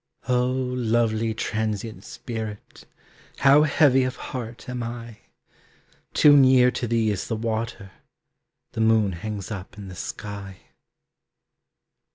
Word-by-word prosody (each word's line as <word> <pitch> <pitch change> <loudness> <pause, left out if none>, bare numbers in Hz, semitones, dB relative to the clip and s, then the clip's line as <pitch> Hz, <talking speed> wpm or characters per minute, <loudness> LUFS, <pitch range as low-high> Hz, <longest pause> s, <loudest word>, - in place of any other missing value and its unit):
Oh, 125 0 +2
lovely 120 -3 0
transient 110 -3 -3
spirit, 110 -3 -7 0.5
How 140 +2 +6
heavy 145 -3 +4
of 130 0 -2
heart 120 -2 -7
am 125 -1 -4
I! 115 -1 -7 1.0
Too 145 -1 +7
near 130 -2 +6
to 120 - -3
thee 115 -1 +1
is 100 - -3
the 115 - -2
water, 110 -3 -3 0.8
The 110 - -3
moon 110 -3 +3
hangs 105 +3 -6
up 95 -1 -7
in 100 -2 -8
the 90 - -9
sky. 100 -1 -7
115 Hz, 120 wpm, -24 LUFS, 105-125 Hz, 1.0 s, Too